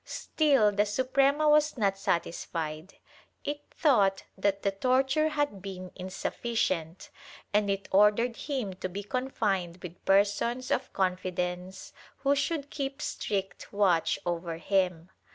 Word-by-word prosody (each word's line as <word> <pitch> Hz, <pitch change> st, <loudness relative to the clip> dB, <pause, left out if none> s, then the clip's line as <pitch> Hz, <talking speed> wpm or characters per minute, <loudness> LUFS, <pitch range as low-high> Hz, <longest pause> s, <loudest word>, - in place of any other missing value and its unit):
Still 275 Hz, -9 st, +2 dB
the 205 Hz, +1 st, +1 dB
Suprema 270 Hz, +7 st, +2 dB
was 300 Hz, -1 st, +4 dB
not 200 Hz, -4 st, +2 dB
satisfied; 165 Hz, -2 st, -3 dB, 0.5 s
it 290 Hz, 0 st, -3 dB
thought 200 Hz, -, +3 dB
that 200 Hz, 0 st, 0 dB
the 200 Hz, -, +2 dB
torture 265 Hz, +8 st, +2 dB
had 290 Hz, -10 st, -1 dB
been 185 Hz, -2 st, -7 dB
insuffi 190 Hz, +5 st, -5 dB
cient 170 Hz, -6 st, -1 dB, 0.4 s
and 205 Hz, -1 st, +3 dB
it 195 Hz, 0 st, -2 dB
ordered 210 Hz, +4 st, +4 dB
him 255 Hz, -10 st, -3 dB
to 185 Hz, 0 st, -5 dB
be 200 Hz, +3 st, -5 dB
confined 205 Hz, -7 st, -1 dB
with 175 Hz, -1 st, -9 dB
persons 205 Hz, +6 st, +2 dB
of -, -, 0 dB
confi 185 Hz, -1 st, -1 dB
dence, 180 Hz, +1 st, -4 dB, 0.2 s
who 275 Hz, +1 st, +2 dB
should 285 Hz, 0 st, -2 dB
keep 275 Hz, 0 st, -4 dB
strict 195 Hz, -8 st, -3 dB
watch 180 Hz, -5 st, +2 dB
over 170 Hz, -1 st, -2 dB
him. 180 Hz, -1 st, 0 dB
200 Hz, 135 wpm, -29 LUFS, 185-260 Hz, 0.5 s, was